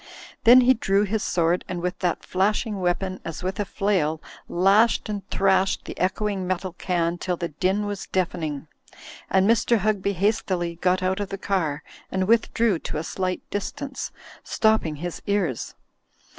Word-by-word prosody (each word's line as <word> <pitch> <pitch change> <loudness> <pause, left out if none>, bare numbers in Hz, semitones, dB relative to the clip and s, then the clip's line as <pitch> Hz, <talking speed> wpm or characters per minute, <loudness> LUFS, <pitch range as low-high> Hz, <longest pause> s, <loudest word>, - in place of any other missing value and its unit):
Then 245 +2 +9
he 255 +1 +6
drew 200 -4 +1
his 210 +1 -1
sword, 175 -1 +1
and 180 -1 -3
with 180 +2 -3
that 180 -2 -1
flashing 205 +2 0
weapon, 185 +1 -1
as 165 +1 -6
with 185 +2 -3
a 205 - 0
flail, 180 -7 0 0.3
lashed 200 +6 +3
and 205 -1 -3
thrashed 190 -1 +2
the - - -7
echoing 190 0 -1
metal 185 0 -2
can 175 -1 -1
till 180 -1 -2
the 170 -1 -3
din 190 +7 0
was 205 -1 -5
deafening, 165 -5 -2 0.6
and 190 0 +3
Mr. 230 +1 +3
Hugby 200 -1 0
hastily 185 -3 0
got 185 +2 +1
out 190 +2 0
of 200 -1 -3
the 195 - -4
car 165 -7 -1 0.3
and 190 0 0
withdrew 225 -3 +2
to - - -5
a 155 - -2
slight 185 +2 -3
distance, 270 +7 -4 0.3
stopping 220 -8 +1
his 175 +3 -6
ears. 195 - -1
190 Hz, 160 wpm, -24 LUFS, 175-205 Hz, 0.6 s, Then